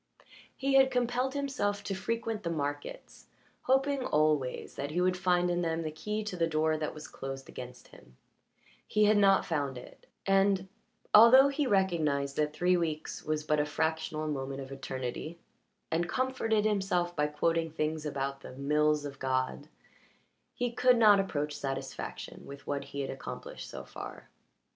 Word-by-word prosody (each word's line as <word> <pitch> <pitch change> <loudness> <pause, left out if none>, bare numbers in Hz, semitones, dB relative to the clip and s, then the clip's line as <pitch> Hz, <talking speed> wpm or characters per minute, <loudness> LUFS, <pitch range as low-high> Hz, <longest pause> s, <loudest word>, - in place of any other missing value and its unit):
He 275 0 0
had 270 -1 +6
compelled 250 +2 0
himself 265 -8 -1
to 195 - -3
frequent 225 +2 -2
the 170 - -3
markets, 145 -2 -5 0.4
hoping 270 +1 +2
always 150 - +1
that 140 +1 -4
he 165 +4 -1
would 180 0 +2
find 180 -1 +2
in 175 0 0
them 165 -1 -1
the 155 - -3
key 210 +7 -3
to 210 -3 -4
the 165 -2 +1
door 155 0 +1
that 155 0 -3
was 155 - -8
closed 135 0 -7
against 125 0 -10
him; 60 0 -18 0.7
he 215 - +2
had 210 +1 +5
not 195 -1 +5
found 145 -6 -2
it, 125 - -13 0.2
and, 195 -1 +3 0.5
although 255 +6 +9
he 280 0 0
recognized 155 - +1
that 150 0 +1
three 180 +4 +2
weeks 160 -3 -3
was 155 0 -1
but 150 0 +1
a 150 - +2
fractional 160 0 -1
moment 135 -2 -3
of 135 0 -9
eternity, 135 +4 -5 0.5
and 170 +2 0
comforted 240 -5 0
himself 190 -4 0
by 150 0 +2
quoting 165 +2 0
things 155 0 -2
about 140 -2 -3
the - - -10
"mills 150 +2 +1
of 140 -1 -7
God," 130 +2 -1 0.9
he 245 -1 -1
could 250 +1 +4
not 210 -3 +7
approach 150 -6 -1
satisfaction 135 -1 -5
with 140 0 -10
what 140 -1 -3
he 140 0 -5
had 135 - -3
accomplished 135 - -7
so - - -7
far. - - -9
160 Hz, 165 wpm, -30 LUFS, 145-205 Hz, 0.9 s, although